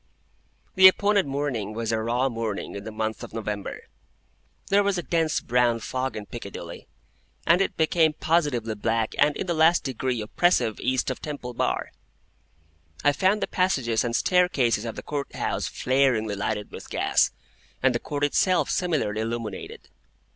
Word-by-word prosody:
The 190 -2 +9
appointed 200 -1 +3
morning 135 -7 -3
was 115 0 -2
a 110 -1 0
raw 120 +4 +1
morning 115 -4 -4
in 100 - -7
the 110 - -5
month 110 0 -3
of - - -9
November. 105 -3 -4 0.9
There 200 +1 +4
was 200 -2 0
a 175 - -2
dense 165 -2 +1
brown 120 -1 +2
fog 130 +3 -3
in 105 - -6
Piccadilly, 100 -3 -8 0.6
and 170 +3 +4
it 195 - -1
became 160 0 +3
positively 145 -9 0
black 110 +1 -1
and 145 0 +3
in - - -3
the 175 - -1
last 165 +2 +4
degree 130 -2 -2
oppressive 115 - +1
East 130 +1 0
of 130 - -6
Temple 140 -5 -6
Bar. - - -1 1.1
I 145 - +5
found 190 +7 +1
the - - -1
passages 135 -12 +1
and 120 -1 -2
staircases 135 - +2
of 115 - -5
the - - -7
Court 145 -1 -5
House - - -2
flaringly 125 -5 +1
lighted 105 +1 -3
with - - -10
gas, - - +2 0.5
and 130 -1 +4
the 120 - 0
Court 145 +2 -4
itself 175 +5 +2
similarly 150 - 0
illuminated. 115 -3 -5
130 Hz, 160 wpm, -25 LUFS, 110-160 Hz, 1.1 s, The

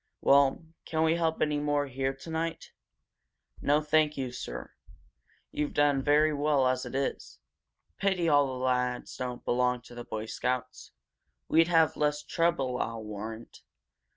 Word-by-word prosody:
Well, 140 +3 +4 0.2
can 160 0 -1
we 160 +1 +3
help 165 -1 +1
any 150 -1 0
more 145 0 0
here 135 0 -2
tonight?" 160 +4 -5 0.9
"No, 145 +2 +3
thank 150 0 +2
you, 130 -2 -3
sir. 60 - -7 0.8
You've 150 0 -3
done 145 -2 +3
very 150 +2 +3
well 145 -2 +2
as 130 0 -1
it - - -7
is. 135 0 -3 0.6
Pity 190 -4 +1
all 145 -2 +4
the 130 -1 -4
lads 125 -1 -1
don't 125 -1 -5
belong 125 0 +1
to 120 - -14
the 120 0 -7
Boy 110 -1 -5
Scouts. 125 +2 -3 0.6
We'd 165 0 +4
have 165 -2 +3
less 150 0 0
trouble, 145 -6 0
I'll 115 -1 -4
warrant. 110 +2 -8
140 Hz, 150 wpm, -29 LUFS, 125-150 Hz, 0.9 s, Well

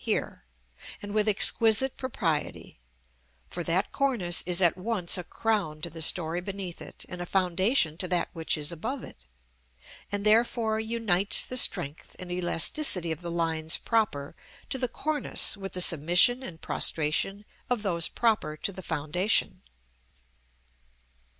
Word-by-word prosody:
here), - - -2 0.6
and 205 0 -8
with 215 0 +1
exquisite 225 +4 +4
propriety; 165 - -4 0.7
for 175 - -4
that 175 +5 -1
cornice 235 -12 0
is 180 0 0
at 175 -3 +4
once 185 -2 0
a 180 - -2
crown 195 -6 -2
to 170 +2 -5
the 165 - -7
story 165 +2 +2
beneath 190 -2 -6
it - - -7
and 180 -1 -8
a - - -4
foundation 185 - +1
to 185 - 0
that 180 -1 0
which 165 -2 -2
is 150 +2 -3
above 225 - -5
it, 60 - -13 0.9
and 205 0 -3
therefore 220 0 +2
unites 220 -4 +2
the 255 - -6
strength 145 - 0
and 180 -1 -8
elasticity 180 - +2
of 160 - -5
the 170 - -6
lines 160 -2 +1
proper 165 -11 -1 0.4
to 265 - 0
the 250 - 0
cornice 295 0 -1
with 195 -1 -7
the 180 - +1
submission 175 - +4
and 170 -10 -8
prostration 165 +6 0 0.2
of 245 -4 -1
those 170 -5 +1
proper 210 -10 -1
to 200 - -3
the 190 - -8
foundation. 180 +4 0
185 Hz, 145 wpm, -27 LUFS, 165-220 Hz, 0.9 s, exquisite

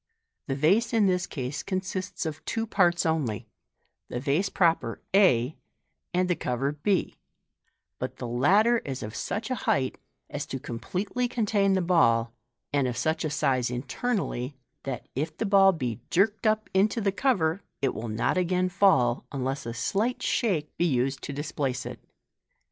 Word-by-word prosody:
The 135 - -1
vase 200 - +3
in 220 -3 +4
this 185 -1 +1
case 135 0 -4
consists 185 -1 -3
of 155 -1 -5
two 225 -1 -1
parts 180 -6 +2
only, 150 -10 0 0.6
the 120 - -3
vase 150 +9 +1
proper 165 - +1 0.2
<z, 150 - +4 0.6
and 180 +1 +1
the 180 - +1
cover 130 +1 -1
b, 165 +6 -1 0.8
but - - -4
the - - -5
latter 200 - +4
is 135 - -5
of 105 +1 -6
such 220 +4 -3
a 250 - -2
height 130 -1 +1 0.3
as 145 0 -5
to 135 - -4
completely 190 - -3
contain 210 -4 +1
the 190 -1 +2
ball, 115 -10 +3 0.4
and 140 -2 +2
of 120 -1 -3
such 155 +6 0
a 155 - 0
size 130 -4 +1
internally, 135 - -2 0.3
that, 130 -4 -4
if 150 +5 -3
the - - -1
ball 195 -1 +6
be 125 - -3
jerked 205 +4 +2
up 215 0 +1
into 200 +4 +3
the 200 -2 +1
cover, 190 -5 +1 0.2
it 135 - 0
will 115 +1 -5
not 110 +11 +1
again 180 +1 +1
fall, 155 -11 +3
unless 135 -2 -3
a 115 - -3
slight 225 - -1
shake 175 - 0
be 175 - +2
used 135 -3 0
to - - -5
displace 140 -3 -3
it. - - -7
160 Hz, 165 wpm, -27 LUFS, 130-195 Hz, 0.8 s, ball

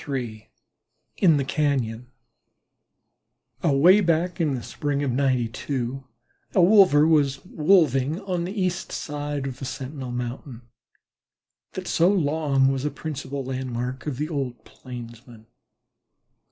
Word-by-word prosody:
III 120 -6 -4 0.7
IN 165 -6 +5
THE 140 - -1
CAÑON 130 -6 -1 1.6
Away 170 +9 +5
back 170 0 0
in 150 -4 +1
the 120 - -5
spring 145 -1 -2
of 135 - 0
'92 130 0 -1 0.5
a 185 - +5
wolver 180 -6 +6
was 145 -3 +2
"wolving" 155 -4 +2
on 180 -3 -2
the 195 +4 -4
east 185 -1 -1
side 145 -2 -4
of 135 -1 -5
the 135 - -5
Sentinel 130 0 -6
Mountain 125 0 -6 1.1
that - - -6
so 170 +2 +3
long 145 -7 +2
was 135 -1 -2
a 150 - 0
principal 140 -3 -5
landmark 130 0 -4
of 140 -4 -3
the 150 +2 -2
old 135 -6 -4
Plainsmen. 120 -2 -11
140 Hz, 125 wpm, -24 LUFS, 125-155 Hz, 1.6 s, wolver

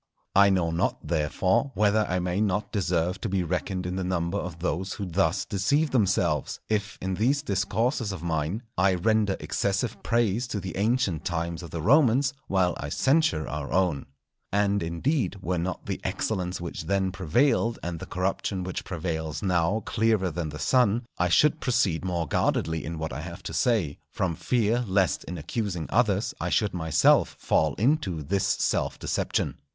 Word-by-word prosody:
I 100 +1 +7
know 90 -4 +1
not, 85 +1 -1
therefore, 90 - +1
whether 105 0 +3
I 90 - +1
may 90 +2 -1
not 105 0 0
deserve 90 -1 0
to - - -2
be 95 -1 0
reckoned 90 +2 -2
in 90 +1 -3
the 95 - -1
number 85 -2 -1
of 85 -2 -5
those 90 +2 -2
who 100 - -4
thus 90 0 +1
deceive 140 +11 +1
themselves, 95 - +1
if, 105 -2 -1
in 95 0 -2
these 130 +9 +1
Discourses 115 +2 0
of 90 -4 -6
mine, 85 +6 -1 0.2
I 95 0 +4
render 105 +1 +1
excessive 100 +4 -1
praise 115 0 +1
to 110 -4 -3
the 95 -1 -6
ancient 100 - +1
times 85 -1 -2
of 85 - -8
the 80 -2 -5
Romans 135 - +4
while 90 -2 +2
I 70 - -4
censure 135 - +2
our 75 -2 -4
own. 90 -6 +1 0.4
And, 100 0 +2
indeed, 90 - -1
were 90 -1 -1
not 90 +2 -3
the - - -4
excellence 90 -4 -2
which 85 0 -6
then 95 -1 +1
prevailed 115 - +1
and 85 -1 -4
the - - -8
corruption 95 +1 -2
which 90 0 -4
prevails 80 -3 -4
now 90 +3 +1
clearer 110 -5 +1
than 80 0 -3
the 75 - -7
sun, 120 +2 +2 0.2
I 90 0 +2
should 150 - +4
proceed 115 -11 +1
more 85 -3 -1
guardedly 80 +3 0
in 80 +2 -5
what 80 -4 -4
I 70 - -4
have 85 +1 -8
to - - -6
say, 105 - +1
from 90 -3 -1
fear 120 +6 +1
lest 95 -2 +1
in 90 - -6
accusing 90 0 -3
others 110 -3 +2
I - - -1
should 105 -3 +1
myself 80 -4 +3
fall 75 -3 +1
into 105 - +1
this 95 +6 0
self - - 0
deception. - - -1
95 Hz, 175 wpm, -26 LUFS, 85-110 Hz, 0.4 s, I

